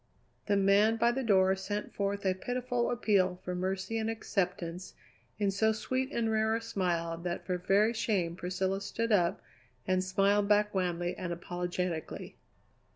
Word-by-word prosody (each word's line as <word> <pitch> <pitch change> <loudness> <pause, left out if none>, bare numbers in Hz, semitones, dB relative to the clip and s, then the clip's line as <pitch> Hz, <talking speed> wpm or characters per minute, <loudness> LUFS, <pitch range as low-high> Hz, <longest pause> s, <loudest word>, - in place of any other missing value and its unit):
The 205 -1 +3
man 200 +3 +4
by 235 +1 +3
the 265 +2 -2
door 190 -5 +4
sent 205 +2 -4
forth 200 0 -2
a 190 - +3
pitiful 245 +4 -2
appeal 195 -6 +2
for 180 - -2
mercy 190 +4 -2
and 220 0 -1
acceptance 180 -5 -3 0.4
in 205 -2 +1
so 220 +3 +2
sweet 260 +4 -2
and 230 -5 0
rare 220 0 +2
a - - 0
smile 175 -6 -1
that 175 0 -4
for 180 -1 -1
very 205 +5 +3
shame 205 -7 0
Priscilla 190 +2 -2
stood 230 +3 -2
up 185 -2 +2 0.4
and 185 0 +1
smiled 200 +2 +2
back 210 0 +3
wanly 175 -2 -1
and 180 - -4
apologetically. 175 -1 -4
195 Hz, 155 wpm, -31 LUFS, 180-220 Hz, 0.4 s, man